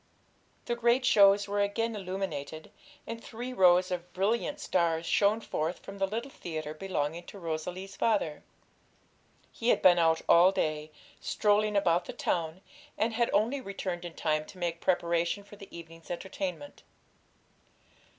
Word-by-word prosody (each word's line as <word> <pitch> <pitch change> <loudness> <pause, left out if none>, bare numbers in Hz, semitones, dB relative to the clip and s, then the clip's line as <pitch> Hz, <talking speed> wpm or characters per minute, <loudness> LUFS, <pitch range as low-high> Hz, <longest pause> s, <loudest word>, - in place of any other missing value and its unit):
The 240 - -1
great 240 +2 +2
shows 200 -4 +6
were 205 0 0
again 225 +3 0
illuminated, 185 -6 -5 0.3
and 230 0 -7
three 245 +3 -6
rows 185 -3 +5
of 180 0 -4
brilliant 230 +10 0
stars 170 - 0
shone 210 +5 +2
forth 165 -3 -2
from 195 0 -11
the 195 - +1
little 230 +7 -4
theatre 155 - -5
belonging 165 -1 -3
to - - -10
Rosalie's 180 +3 -5
father. 200 -10 0 1.1
He 235 - -2
had - - +3
been 175 -1 +7
out 165 -1 +3
all 175 +3 +7
day, 155 -4 -2 0.3
strolling 210 0 +1
about 175 -3 +2
the - - -7
town, 165 +1 -2 0.4
and 225 +2 0
had 235 +1 +1
only 240 +7 +1
returned 185 -4 -4
in 175 -2 -8
time 155 -1 0
to - - -13
make 170 -2 -3
preparation 170 +2 +1
for 205 - -14
the 200 -1 -12
evening's 165 -1 -12
entertainment. 280 +10 -5
190 Hz, 150 wpm, -30 LUFS, 170-215 Hz, 1.1 s, been